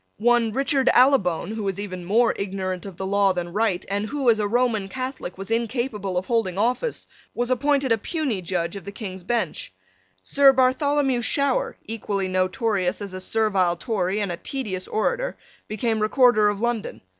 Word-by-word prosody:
One 235 Hz, 0 st, +3 dB
Richard 270 Hz, +2 st, +2 dB
Allibone, 240 Hz, -9 st, +3 dB
who 220 Hz, 0 st, -4 dB
was 195 Hz, -2 st, -2 dB
even 185 Hz, -3 st, -5 dB
more 230 Hz, +6 st, +3 dB
ignorant 190 Hz, -1 st, -4 dB
of 190 Hz, -3 st, -10 dB
the 190 Hz, -, -4 dB
law 200 Hz, 0 st, +2 dB
than 175 Hz, -1 st, -4 dB
Wright, 205 Hz, -4 st, 0 dB
and 205 Hz, +2 st, -2 dB
who, 270 Hz, -2 st, +2 dB
as 220 Hz, -, 0 dB
a 210 Hz, -, +1 dB
Roman 230 Hz, -3 st, +1 dB
Catholic, 255 Hz, -6 st, -5 dB
was 195 Hz, +3 st, -6 dB
incapable 230 Hz, -4 st, -1 dB
of 180 Hz, -, -1 dB
holding 220 Hz, -6 st, 0 dB
office, 250 Hz, -, 0 dB, 0.3 s
was 245 Hz, +1 st, -1 dB
appointed 275 Hz, +1 st, +1 dB
a 225 Hz, -, +3 dB
puisne 270 Hz, -, -2 dB
judge 170 Hz, 0 st, -2 dB
of 200 Hz, -, -7 dB
the 200 Hz, -, -6 dB
King's 190 Hz, -3 st, -7 dB
Bench. 240 Hz, -, -2 dB, 0.5 s
Sir 275 Hz, -1 st, +5 dB
Bartholomew 265 Hz, 0 st, +2 dB
Shower, 280 Hz, +3 st, +1 dB
equally 205 Hz, -3 st, -3 dB
notorious 185 Hz, 0 st, 0 dB
as 200 Hz, -2 st, -7 dB
a 185 Hz, -, -6 dB
servile 195 Hz, -4 st, +1 dB
Tory 200 Hz, -2 st, -1 dB
and 200 Hz, -3 st, -1 dB
a 170 Hz, -, -4 dB
tedious 200 Hz, -6 st, -4 dB
orator, -, -, -1 dB, 0.3 s
became 220 Hz, +1 st, -1 dB
Recorder 215 Hz, -1 st, +4 dB
of 205 Hz, -1 st, -3 dB
London. 235 Hz, -1 st, -2 dB
215 Hz, 175 wpm, -23 LUFS, 190-250 Hz, 0.5 s, Sir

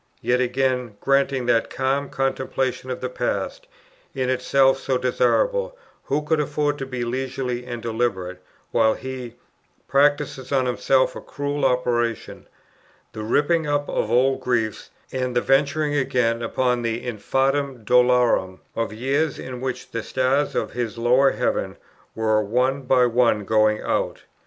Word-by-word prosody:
yet 125 Hz, +2 st, +1 dB
again, 125 Hz, -3 st, 0 dB
granting 135 Hz, -2 st, +1 dB
that 115 Hz, -1 st, +2 dB
calm 135 Hz, +2 st, -1 dB
contemplation 130 Hz, -1 st, -2 dB
of 125 Hz, -, -4 dB
the 125 Hz, -, -1 dB
past, 120 Hz, -6 st, -3 dB, 0.5 s
in 130 Hz, -1 st, 0 dB
itself 135 Hz, +1 st, +3 dB
so 130 Hz, -1 st, 0 dB
desirable, -, -, +1 dB, 0.3 s
who 145 Hz, +2 st, 0 dB
could 155 Hz, +1 st, +1 dB
afford 150 Hz, 0 st, 0 dB
to 135 Hz, -, -4 dB
be 125 Hz, -2 st, -3 dB
leisurely 125 Hz, 0 st, -3 dB
and 120 Hz, -2 st, -6 dB
deliberate, 100 Hz, -6 st, -2 dB, 0.3 s
while 110 Hz, 0 st, +3 dB
he 130 Hz, -3 st, -7 dB, 0.5 s
practises 140 Hz, -2 st, +1 dB
on 135 Hz, -2 st, +2 dB
himself 130 Hz, +1 st, +2 dB
a -, -, -7 dB
cruel 145 Hz, 0 st, -4 dB
operation, 120 Hz, -3 st, 0 dB, 0.7 s
the 110 Hz, -, -6 dB
ripping 150 Hz, +8 st, +1 dB
up 145 Hz, 0 st, 0 dB
of 110 Hz, -, -1 dB
old 130 Hz, +3 st, +3 dB
griefs, 115 Hz, -4 st, -1 dB, 0.2 s
and 125 Hz, -1 st, -2 dB
the -, -, +4 dB
venturing 145 Hz, +2 st, +2 dB
again 125 Hz, -4 st, +1 dB
upon 125 Hz, +1 st, 0 dB
the 115 Hz, +1 st, -2 dB
"infandum 135 Hz, +3 st, -1 dB
dolorem" 125 Hz, -6 st, +3 dB, 0.2 s
of 115 Hz, -3 st, -1 dB
years 135 Hz, +7 st, -1 dB
in 125 Hz, -1 st, -7 dB
which 130 Hz, -1 st, -4 dB
the 115 Hz, -, -3 dB
stars 130 Hz, +5 st, 0 dB
of -, -, -2 dB
this 120 Hz, -2 st, -3 dB
lower 125 Hz, +4 st, +4 dB
heaven -, -, -2 dB, 0.4 s
were 110 Hz, -1 st, +2 dB
one 125 Hz, +6 st, 0 dB
by 125 Hz, -1 st, +3 dB
one 115 Hz, -3 st, +2 dB
going 110 Hz, 0 st, +3 dB
out? -, -, -1 dB
125 Hz, 145 wpm, -23 LUFS, 120-135 Hz, 0.7 s, the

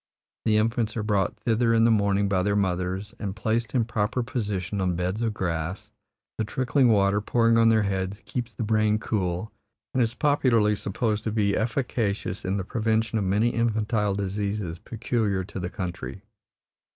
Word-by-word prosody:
The 110 Hz, -1 st, +3 dB
infants 115 Hz, +1 st, 0 dB
are 110 Hz, -, -1 dB
brought 100 Hz, -3 st, 0 dB
thither 115 Hz, +1 st, +2 dB
in 115 Hz, -, +4 dB
the 115 Hz, -, +5 dB
morning 100 Hz, -2 st, +2 dB
by 95 Hz, -2 st, +1 dB
their 100 Hz, +2 st, +1 dB
mothers 95 Hz, +1 st, -1 dB
and 100 Hz, -2 st, -4 dB
placed 115 Hz, +2 st, -1 dB
in 120 Hz, -3 st, +3 dB
proper 120 Hz, +1 st, -1 dB
position 105 Hz, -6 st, -3 dB
on 90 Hz, -2 st, +1 dB
beds 90 Hz, +5 st, -2 dB
of 115 Hz, -1 st, +1 dB
grass; 85 Hz, 0 st, -3 dB, 0.5 s
the -, -, +2 dB
trickling 130 Hz, +4 st, +2 dB
water, 100 Hz, -1 st, +3 dB
pouring 115 Hz, +2 st, +3 dB
on 115 Hz, 0 st, +6 dB
their 110 Hz, -1 st, +4 dB
heads, 95 Hz, 0 st, -2 dB
keeps 120 Hz, -2 st, -4 dB
the 115 Hz, +2 st, -4 dB
brain 110 Hz, 0 st, +2 dB
cool 95 Hz, -2 st, -2 dB, 0.4 s
and 130 Hz, -, +2 dB
is 115 Hz, 0 st, 0 dB
popularly 120 Hz, -8 st, +3 dB
supposed 105 Hz, +2 st, -2 dB
to 110 Hz, -, 0 dB
be 105 Hz, -2 st, +1 dB
efficacious 110 Hz, -4 st, -1 dB
in 95 Hz, +2 st, -1 dB
the 95 Hz, -, -2 dB
prevention 110 Hz, +2 st, 0 dB
of 100 Hz, -, -1 dB
many 105 Hz, +5 st, +2 dB
infantile 110 Hz, -3 st, 0 dB
diseases 100 Hz, -3 st, -3 dB
peculiar 110 Hz, -3 st, -1 dB
to 95 Hz, +1 st, -7 dB
the 90 Hz, 0 st, -3 dB
country. 95 Hz, +1 st, -6 dB
105 Hz, 175 wpm, -26 LUFS, 100-115 Hz, 0.5 s, on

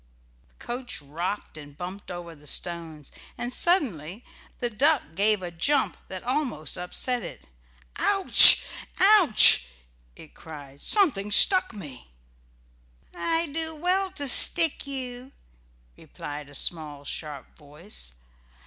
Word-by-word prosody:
The -, -, -18 dB
coach 245 Hz, +1 st, -6 dB
rocked 160 Hz, +4 st, -7 dB
and 145 Hz, -1 st, -15 dB
bumped 185 Hz, +3 st, -10 dB
over 175 Hz, -1 st, -9 dB
the 150 Hz, -1 st, -18 dB
stones, 165 Hz, -4 st, -4 dB, 0.3 s
and 240 Hz, +1 st, -6 dB
suddenly 225 Hz, -, -1 dB, 0.3 s
the 240 Hz, -1 st, -4 dB
duck 285 Hz, +7 st, 0 dB
gave 205 Hz, +2 st, -1 dB
a 175 Hz, -, -7 dB
jump 275 Hz, -, -1 dB
that 185 Hz, -1 st, -9 dB
almost 250 Hz, -, -4 dB
upset 235 Hz, +7 st, -3 dB
it. 175 Hz, -, -12 dB, 0.5 s
"Ouch! 390 Hz, -2 st, +7 dB, 0.3 s
ouch!" 375 Hz, -, +5 dB, 0.5 s
it 155 Hz, -, -17 dB
cried. 145 Hz, -3 st, -14 dB
"Something 255 Hz, -, 0 dB
stuck 370 Hz, -, +4 dB
me." 150 Hz, -, -12 dB, 1.1 s
"I 330 Hz, 0 st, -2 dB
do 320 Hz, +1 st, -2 dB
well 365 Hz, +4 st, -2 dB
to 285 Hz, -6 st, -3 dB
stick 325 Hz, +3 st, +5 dB
you," 255 Hz, -1 st, -8 dB, 0.6 s
replied 145 Hz, -, -11 dB
a 145 Hz, -, -11 dB
small 150 Hz, -2 st, -4 dB
sharp 145 Hz, -2 st, -9 dB
voice. 150 Hz, -, -10 dB
205 Hz, 120 wpm, -24 LUFS, -, 1.1 s, Ouch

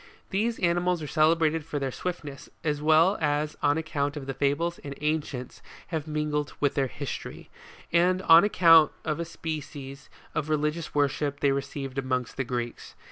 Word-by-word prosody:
These 225 Hz, +4 st, 0 dB
animals 175 Hz, -1 st, +1 dB
are -, -, -4 dB
celebrated 160 Hz, +1 st, +2 dB
for 150 Hz, -1 st, -4 dB
their 135 Hz, -2 st, -2 dB
swiftness, 150 Hz, -3 st, -6 dB
as 150 Hz, -2 st, -1 dB
well 160 Hz, +6 st, +4 dB
as 150 Hz, 0 st, 0 dB
on 145 Hz, +2 st, +3 dB
account 145 Hz, -2 st, -2 dB
of 140 Hz, -, -6 dB
the 135 Hz, -, -3 dB
fables 145 Hz, +6 st, 0 dB
the 140 Hz, 0 st, -8 dB
ancients 150 Hz, -5 st, -2 dB, 0.3 s
have 160 Hz, -3 st, -3 dB
mingled 150 Hz, -1 st, -2 dB
with 145 Hz, -2 st, +2 dB
their 135 Hz, -2 st, +1 dB
history, 140 Hz, +2 st, -7 dB, 0.4 s
and 180 Hz, +2 st, +3 dB
on 165 Hz, +1 st, +8 dB
account 165 Hz, -6 st, +6 dB
of 155 Hz, 0 st, -1 dB
a 170 Hz, -, -2 dB
species 145 Hz, -4 st, -7 dB, 0.2 s
of 155 Hz, -1 st, -2 dB
religious 155 Hz, +1 st, -1 dB
worship 145 Hz, 0 st, 0 dB
they 140 Hz, -, +4 dB
received 135 Hz, -1 st, -3 dB
amongst 130 Hz, -2 st, -2 dB
the 135 Hz, -, -1 dB
Greeks. 120 Hz, -1 st, -5 dB
150 Hz, 165 wpm, -27 LUFS, 140-165 Hz, 0.4 s, on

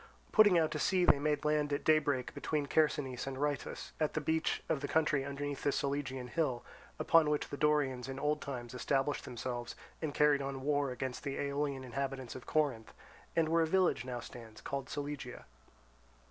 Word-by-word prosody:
Putting 205 Hz, -5 st, +7 dB
out 160 Hz, -2 st, +2 dB
to 150 Hz, -, -2 dB
sea 185 Hz, +3 st, +3 dB
they 145 Hz, -, +5 dB
made 150 Hz, 0 st, 0 dB
land 150 Hz, -1 st, +2 dB
at 145 Hz, -, -1 dB
daybreak 145 Hz, -5 st, +2 dB
between 150 Hz, -2 st, -1 dB
Chersonese 140 Hz, -4 st, +1 dB
and 135 Hz, -1 st, -4 dB
Rheitus, 145 Hz, -2 st, -2 dB
at 155 Hz, -1 st, 0 dB
the -, -, +2 dB
beach 160 Hz, +1 st, 0 dB
of 155 Hz, -4 st, 0 dB
the -, -, -2 dB
country 155 Hz, -3 st, +2 dB
underneath 140 Hz, 0 st, -4 dB
the 145 Hz, -, +2 dB
Solygian 135 Hz, -2 st, -2 dB
hill, 130 Hz, -4 st, -1 dB, 0.3 s
upon 165 Hz, -2 st, +4 dB
which 150 Hz, -1 st, 0 dB
the -, -, -4 dB
Dorians 140 Hz, -4 st, +1 dB
in 135 Hz, 0 st, -5 dB
old 150 Hz, +1 st, 0 dB
times 125 Hz, -4 st, -6 dB
established 135 Hz, +3 st, 0 dB
themselves 120 Hz, 0 st, -5 dB, 0.3 s
and 155 Hz, -2 st, -1 dB
carried 145 Hz, -1 st, +4 dB
on 135 Hz, -1 st, -4 dB
war 145 Hz, -1 st, +1 dB
against 125 Hz, +1 st, -4 dB
the 140 Hz, -1 st, -3 dB
Aeolian 140 Hz, -1 st, -1 dB
inhabitants 130 Hz, 0 st, -4 dB
of 130 Hz, +1 st, -10 dB
Corinth, 140 Hz, -8 st, 0 dB, 0.4 s
and 165 Hz, -1 st, +3 dB
where 165 Hz, +1 st, +3 dB
a 160 Hz, -, +2 dB
village 185 Hz, -2 st, +2 dB
now 125 Hz, -1 st, -4 dB
stands 115 Hz, -2 st, -10 dB
called 135 Hz, -1 st, -4 dB
Solygia. 145 Hz, -, -5 dB
140 Hz, 185 wpm, -34 LUFS, 130-150 Hz, 0.4 s, Putting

